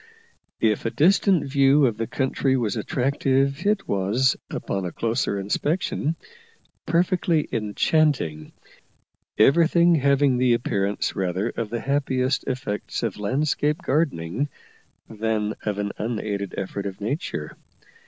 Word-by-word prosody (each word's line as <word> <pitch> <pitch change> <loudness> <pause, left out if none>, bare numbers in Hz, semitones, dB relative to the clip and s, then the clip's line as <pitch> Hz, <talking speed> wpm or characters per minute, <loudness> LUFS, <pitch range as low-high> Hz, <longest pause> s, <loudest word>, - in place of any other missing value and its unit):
If 110 -2 +2
a - - +2
distant 185 - +3
view 140 +1 +4
of 115 -4 +1
the 115 0 -2
country 135 0 0
was 110 -5 -1
attractive, 140 +4 0
it 210 -1 +1
was, 100 +7 +1
upon 95 - -3
a 90 - -3
closer 115 -1 -1
inspection, 150 - -1 0.7
perfectly 170 -2 +1
enchanting, 110 - 0 0.9
everything 170 +7 +5
having 140 -3 +3
the 125 -2 +4
appearance 100 -3 -1
rather 95 +2 -1
of 115 -2 -4
the 115 +1 -3
happiest 135 -1 0
effects 120 -6 -3
of 115 -5 -2
landscape 145 - 0
gardening 140 - 0 0.6
than 110 -1 -1
of 105 -1 -1
an 100 0 -2
unaided 105 -3 -3
effort 100 +1 -4
of 95 - -7
nature. 130 - -4
130 Hz, 120 wpm, -24 LUFS, 105-145 Hz, 0.9 s, everything